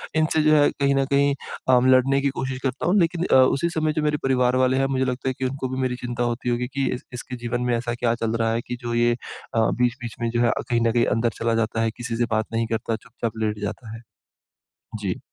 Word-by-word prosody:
इनसे 155 0 +2
जो 155 - +5
है 145 -1 +5
कहीं 140 0 0
न 135 0 +2
कहीं 140 0 +3 0.4
अम, 125 +1 +5
लड़ने 135 +2 +4
की 140 - +1
कोशिश 130 -1 -3
करता 135 0 -2
हूँ। 190 - +3
लेकिन 170 +1 +1
अ, - - +6
उसी 130 +5 +4
समय 155 -2 0
जो 155 - -1
मेरे 150 0 +1
परिवार 125 -1 +2
वाले 130 +1 +2
हैं, 135 - +2
मुझे 130 -1 0
लगता 125 +1 -2
है - - -1
कि 130 - -1
उनको 130 0 -3
भी - - -3
मेरी 125 -1 0
चिंता 120 0 -2
होती 120 +1 -2
होगी 120 +1 0
कि 140 -1 0
इस 125 - -9
इसके 125 +1 -6
जीवन 120 +1 -2
में 120 - +2
ऐसा 120 0 -3
क्या 115 -1 +2
चल 115 0 0
रहा 115 -1 +1
है 115 - -1
कि 125 - -3
जो 120 0 -3
ये 120 0 +3
अ, 120 -1 -6 0.2
बीच-बीच 120 -1 -1
में 115 - 0
जो 120 +1 0
है 120 - +4
अ, - - -1
कहीं 120 -1 +2
न - - +3
कहीं 120 0 +2
अंदर 115 +2 +1
चला 115 0 +1
जाता 110 +1 -1
है, 115 - +1
किसी 120 -1 -4
से 120 - +2
बात 110 0 +1
नहीं 115 0 0
करता, 115 0 -2
चुपचाप 115 0 -6
लेट 105 -1 -1
जाता 110 +2 -5
है। 115 - -10 1.0
जी। 95 -3 -3
125 Hz, 260 wpm, -23 LUFS, 115-135 Hz, 1.0 s, अ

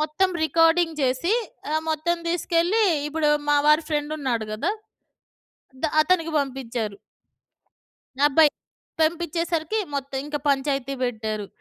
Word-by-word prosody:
మొత్తం 310 +5 +1 0.2
రికార్డింగ్ 330 +1 +3
చేసి 265 +10 +1 0.4
ఆహ్, 315 - +1
మొత్తం 335 +3 0
దీసుకెళ్ళి 345 +5 +1 0.3
ఇప్పుడు 300 0 0 0.2
మావారి 300 +2 +4
ఫ్రెండున్నాడు 295 -6 -1
గదా! 215 - -1 1.1
ద - - -2 0.2
అతనికి 330 -2 +1
బంపిచ్చారు. 245 -6 -3 1.3
అబ్బాయి, 300 +1 +5 0.5
పంపిచ్చేసరికి 335 +3 0 0.2
మొత్తం 275 -1 -3
ఇంక 295 0 -4
పంచాయతీ 275 -1 0
బెట్టారు. 215 -4 -2
300 Hz, 100 wpm, -24 LUFS, 270-330 Hz, 1.3 s, అబ్బాయి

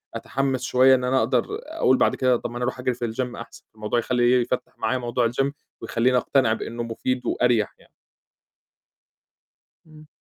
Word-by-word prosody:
أتحمس 135 -1 -2
شوية 130 +1 +5
إن 125 - -2
أنا 130 +1 +2
أقدر 120 +1 +1 0.2
أقول 310 - +1
بعد - - +2
كده 130 -1 +2
طَب 120 - -5
ما 120 - -6
أنا 125 - -3
أرُوح 125 +1 -2
أجري 125 0 0
في 120 -2 -4
الGym 125 0 -3
أحسن، 115 0 -11
الموضوع 110 +2 -1
يخلي، 125 +1 +2
يفتح 125 +1 -4
معايا 130 - 0
موضوع 120 -1 0
الGym 135 +3 0 0.3
ويخليني 125 +2 +1
أقتنع 125 -2 +2
بأنه 115 +1 -5
مفيد 125 +2 -3
وأريّح 120 -4 +1
يعني. - - -23 2.0
إمم. 155 -1 -16
125 Hz, 170 wpm, -24 LUFS, 120-130 Hz, 2.0 s, شوية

